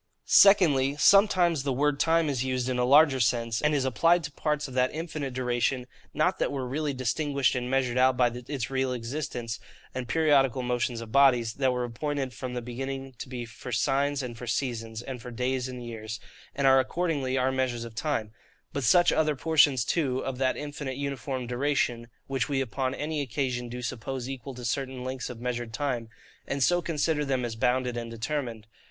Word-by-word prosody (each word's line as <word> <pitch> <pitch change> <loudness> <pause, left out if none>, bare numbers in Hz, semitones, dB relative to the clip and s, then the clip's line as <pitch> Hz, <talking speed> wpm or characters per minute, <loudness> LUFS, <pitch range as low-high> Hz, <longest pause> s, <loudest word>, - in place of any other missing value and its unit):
SECONDLY, 145 -9 +5
sometimes 180 -4 +5
the 140 0 -1
word 145 +2 +1
time 165 0 +3
is 135 -4 0
used 130 -1 -1
in 125 -1 -1
a - - +3
larger 140 0 +6
sense, 115 -1 +1
and 150 0 +2
is 135 -2 +1
applied 165 +7 +3
to 150 - -5
parts 150 0 -1
of 130 - -10
that 130 0 +2
infinite 155 -4 -4
duration, 125 0 0 0.3
not 180 +5 +1
that - - 0
were 135 -2 -3
really 145 +3 -1
distinguished 140 +2 0
and 125 -1 -2
measured 130 -2 +1
out 130 0 +4
by 125 -1 +5
this 125 +1 -5
real 130 -1 0
existence, 120 -3 -4 0.3
and 125 -1 -4
periodical 135 -5 +3
motions 120 -1 -1
of 115 -1 -9
bodies, 125 -4 +4
that 135 -2 +1
were 125 0 -1
appointed 135 +2 -3
from 125 -2 -6
the 120 - -3
beginning 135 +2 -5
to - - -7
be 125 -2 -5
for 115 +1 -9
signs 140 +4 +1
and 120 -2 -6
for 125 - -7
seasons 115 -2 -3
and 130 -2 -6
for 125 - -8
days 125 +1 -1
and 125 -1 -7
years, 110 -1 -6 0.4
and 140 - 0
are 135 0 +7
accordingly 140 -2 -1
our 130 +1 +2
measures 130 -3 -1
of 115 - -9
time; 115 -4 -2 0.4
but 140 - -2
such 175 +9 +5
other 155 -1 +2
portions 145 -4 +3
too 140 -7 0
of 130 -1 -4
that 130 -1 +1
infinite 145 -3 -5
uniform 140 -2 -3
duration, 125 -2 0 0.2
which 135 -2 -2
we 140 -2 0
upon 130 +1 -2
any 150 0 -2
occasion 125 -2 -2
do 125 +1 -6
suppose 125 +2 -4
equal 135 0 -6
to 125 0 -7
certain 130 +1 -2
lengths 130 0 -4
of 120 -2 -8
measured 120 -1 -3
time; 120 -4 -2 0.4
and 135 -1 0
so 175 +4 +3
consider 160 -2 0
them 130 -3 0
as 115 -1 -4
bounded 125 +1 +1
and 115 -1 -4
determined. 115 -1 -4
130 Hz, 195 wpm, -28 LUFS, 125-145 Hz, 0.4 s, are